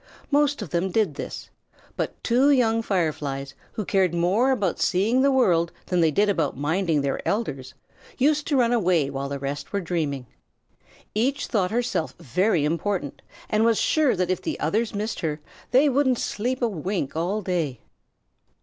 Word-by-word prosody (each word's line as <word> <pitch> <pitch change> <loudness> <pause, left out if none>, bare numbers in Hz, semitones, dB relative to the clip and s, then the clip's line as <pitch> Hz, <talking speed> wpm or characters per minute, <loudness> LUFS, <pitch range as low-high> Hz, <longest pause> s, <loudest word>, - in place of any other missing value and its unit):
Most 290 -4 +2
of 170 - -9
them 175 +2 0
did 200 -4 +1
this, - - -7 0.4
but - - -4
two 255 +4 +3
young 230 -5 +3
Fireflies, 150 -9 -2 0.2
who 215 - -4
cared 185 -3 +2
more 190 +10 +2
about 205 -9 0
seeing 220 +8 +2
the 280 - +4
world 175 -11 +3
than 180 -1 +1
they 165 - +4
did 205 +7 +2
about 165 -10 0
minding 160 +2 +1
their 140 -1 -1
elders, 145 - -2 0.4
used 295 +2 +2
to 290 - +2
run 240 -1 +3
away 175 - +2
while 140 0 -4
the 140 - -3
rest 140 +1 -5
were 200 - 0
dreaming. 155 -7 -2 0.9
Each 265 +6 0
thought 195 -6 0
herself 225 -7 -1
very 175 - +1
important, 165 -1 -2 0.3
and 215 +1 +2
was 230 -1 +3
sure 305 -7 +2
that 180 0 0
if 185 - -1
the - - -4
others 215 +8 0
missed 215 +2 -3
her 155 -2 -2 0.3
they 265 +4 +5
wouldn't 265 -2 +2
sleep 250 +5 -2
a - - +4
wink 180 -6 -3
all 185 +6 -1
day. 165 - -2
190 Hz, 170 wpm, -24 LUFS, 160-235 Hz, 0.9 s, they